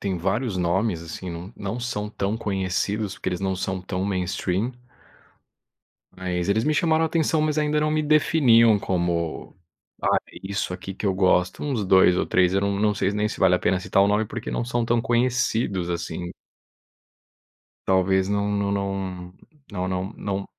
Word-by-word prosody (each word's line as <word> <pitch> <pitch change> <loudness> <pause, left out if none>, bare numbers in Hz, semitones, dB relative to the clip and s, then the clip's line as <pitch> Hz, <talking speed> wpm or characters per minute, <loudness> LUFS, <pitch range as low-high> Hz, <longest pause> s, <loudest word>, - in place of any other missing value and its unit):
tem 95 -2 -2
vários 100 +4 -1
nomes, 90 +1 0
assim, 85 +2 -7
não 85 +5 -8
não 100 +5 -4
são 105 -4 -3
tão 100 +1 -2
conhecidos 100 0 -2
porque 100 - -4
eles 90 0 -3
não 95 -1 0
são 95 0 -3
tão 95 0 -3
mainstream. 95 +3 -1 1.4
Mas 90 0 -2
eles 110 +2 +2
me 155 - +2
chamaram 160 +1 +2
atenção, 160 -1 +1
mas 155 0 0
ainda 150 0 +1
não 155 - +1
me 155 0 +1
definiam 130 -7 +5
como, 85 -4 -2 0.5
ah, - - +3
é - - -13
isso 95 -1 -3
aqui 95 +1 -6
que 100 - -6
eu 95 - +2
gosto, 90 -1 +2
uns 130 -9 -1
2 95 -1 +5
ou - - +1
3 90 0 +2
eu 95 - +3
não 100 0 0
não 105 0 +2
sei 100 -1 0
nem 105 +1 0
se - - -7
vale 95 -1 +5
a - - -2
pena 95 - +1
citar 95 +1 +2
o 100 - +3
nome, 105 +2 +2
porque 120 +2 -6
não 120 - -2
são 120 -1 -1
tão 120 0 +1
conhecidos 120 -6 0
assim. 85 0 -4 1.6
Talvez 95 0 +2
não 100 0 0
não 100 -1 0
não 95 -2 -3 0.4
não 90 -2 -3
não 95 +3 -3
não 100 -1 -3
100 Hz, 180 wpm, -24 LUFS, 95-115 Hz, 1.6 s, definiam